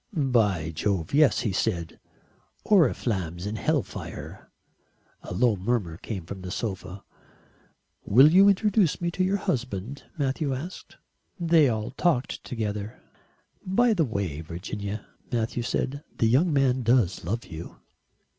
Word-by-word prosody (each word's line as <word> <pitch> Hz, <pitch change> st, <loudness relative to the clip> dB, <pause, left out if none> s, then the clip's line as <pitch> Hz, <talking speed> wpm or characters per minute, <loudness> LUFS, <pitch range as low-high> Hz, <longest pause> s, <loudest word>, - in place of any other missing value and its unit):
"By 105 Hz, -, +2 dB
Jove, 90 Hz, -, -2 dB
yes," 150 Hz, -1 st, +4 dB
he 115 Hz, -5 st, -1 dB
said, 85 Hz, -3 st, -2 dB, 0.7 s
"oriflammes 100 Hz, -, +1 dB
and 105 Hz, +2 st, -3 dB
hell -, -, +1 dB
fire." -, -, -9 dB, 0.7 s
A -, -, -10 dB
low 110 Hz, +5 st, +2 dB
murmur 95 Hz, -4 st, -1 dB
came 95 Hz, -3 st, -6 dB
from 95 Hz, +2 st, -7 dB
the 90 Hz, -, -6 dB
sofa. 95 Hz, -2 st, -5 dB, 1.0 s
"Will 130 Hz, +9 st, +6 dB
you 195 Hz, +2 st, +7 dB
introduce 200 Hz, -3 st, +2 dB
me 175 Hz, 0 st, -1 dB
to 185 Hz, -, 0 dB
your 190 Hz, +2 st, +1 dB
husband?" 125 Hz, -, -3 dB
Matthew 140 Hz, -1 st, -1 dB
asked. 165 Hz, +8 st, -8 dB, 0.4 s
They 165 Hz, -4 st, +4 dB
all 110 Hz, -2 st, -2 dB
talked 135 Hz, -2 st, 0 dB
together. 105 Hz, -3 st, -4 dB, 0.6 s
"By 230 Hz, +5 st, +3 dB
the 175 Hz, -6 st, +2 dB
way, 100 Hz, -, -3 dB
Virginia," 100 Hz, +5 st, -6 dB, 0.3 s
Matthew 115 Hz, 0 st, -1 dB
said, 140 Hz, +4 st, -2 dB
"the -, -, +2 dB
young 140 Hz, +10 st, +3 dB
man 135 Hz, -3 st, +2 dB
does 115 Hz, -6 st, +2 dB
love 115 Hz, +8 st, -3 dB
you." 80 Hz, 0 st, -9 dB
115 Hz, 135 wpm, -26 LUFS, 95-145 Hz, 1.0 s, you